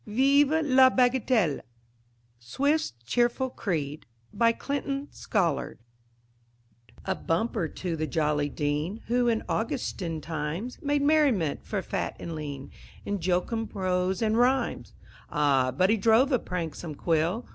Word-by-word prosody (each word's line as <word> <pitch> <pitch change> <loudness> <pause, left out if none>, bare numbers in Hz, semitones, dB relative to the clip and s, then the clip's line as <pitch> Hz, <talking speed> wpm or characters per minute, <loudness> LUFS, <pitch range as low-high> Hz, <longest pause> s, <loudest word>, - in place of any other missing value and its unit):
VIVE 280 +7 +3
LA 260 -2 +6
BAGATELLE 245 - +2 0.8
("Swift's 280 - 0
Cheerful 245 - +1
Creed") 155 - -3 0.3
BY 230 0 +4
CLINTON 280 +2 -3
SCOLLARD 175 - -1 1.3
A - - 0
bumper 180 +1 -1
to 175 +1 -4
the 155 0 -2
jolly 150 -3 0
Dean 150 +9 -2
Who, 245 0 +2
in 225 -2 +1
"Augustan" 195 - -2
times, 160 - -4
Made 285 0 0
merriment 280 - +2
for - - -2
fat - - -3
and 170 - -6
lean 145 -3 -6 0.3
In 205 -1 -2
jocund 185 +6 -1
prose 185 0 -1
and 220 +1 +2
rhymes! 260 +2 +1 0.3
Ah, 140 -3 +2
but 185 +9 +2
he 225 - +3
drove 225 +6 +4
a 255 - +3
pranksome 165 -4 -5
quill! 170 - 0
200 Hz, 125 wpm, -27 LUFS, 160-250 Hz, 1.3 s, LA